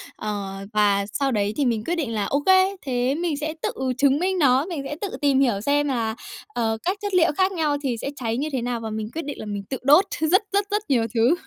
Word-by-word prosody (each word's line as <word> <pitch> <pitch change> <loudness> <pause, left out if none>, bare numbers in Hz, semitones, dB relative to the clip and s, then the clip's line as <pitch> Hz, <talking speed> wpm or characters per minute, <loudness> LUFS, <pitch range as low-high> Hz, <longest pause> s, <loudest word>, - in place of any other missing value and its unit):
Ờ, 205 -2 -4 0.2
và 205 -1 +3
sau 275 +2 0
đấy 205 -2 0
thì 285 - +2
mình 230 -3 0
quyết 345 - -1
định 280 -9 -2
là 210 -2 -1
ô 280 - 0
kê, 380 +1 +5
thế 255 0 0
mình 330 -2 -1
sẽ 310 +1 -3
tự - - 0 0.3
chứng 280 +1 +3
minh 370 +1 0
nó, 270 -1 +4
mình 335 -6 -4
sẽ 295 - -4
tự 405 - -2
tìm 280 -2 +3
hiểu 240 -7 +2
xem 290 +4 +1
là, 230 -5 -1 0.4
ờ, 225 -2 0
các 375 +3 0
chất 410 -2 -3
liệu 340 -2 +4
khác 375 0 +3
nhau 310 -5 0
thì 250 -4 -1
sẽ 275 - -3
cháy 230 -4 -2
như 300 +4 -2
thế 260 -3 -1
nào 240 0 -2
và 225 -1 -5
mình 215 0 -4
quyết 325 -1 -4
định 290 - -6
là - - -6
mình 205 -1 -4
tự 265 - -2
đốt 295 +8 +6
rất, 330 +7 +4
rất, 405 0 +2
rất 415 +1 +1
nhiều 235 -5 +3
thứ. 235 +8 +4
275 Hz, 260 wpm, -23 LUFS, 225-320 Hz, 0.4 s, đốt